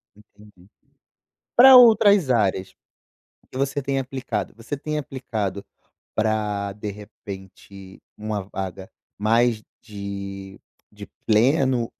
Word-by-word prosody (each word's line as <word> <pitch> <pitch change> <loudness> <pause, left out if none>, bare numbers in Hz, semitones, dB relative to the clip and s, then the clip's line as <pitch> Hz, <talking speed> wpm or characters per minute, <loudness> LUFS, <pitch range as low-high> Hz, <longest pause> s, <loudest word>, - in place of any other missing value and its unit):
Entendi. 105 -3 -20 0.9
Pra 260 +1 +10
outras 205 - +6
áreas 95 -5 0 0.8
que 130 - -7
você 140 +1 -1
tem 135 0 -1
aplicado? 125 -6 -4
Você 115 +5 -6
tem 150 +2 -4
aplicado 110 -8 -4 0.5
pra, 105 -2 -1
de 105 +1 -6
repente, 100 -2 -12 0.2
uma 105 -2 -4
vaga 95 0 -6 0.3
mais 115 +1 +2 0.2
de 100 -2 -8 0.3
de 105 0 -10 0.2
pleno, 125 +1 +2
105 Hz, 100 wpm, -23 LUFS, 100-130 Hz, 0.9 s, Pra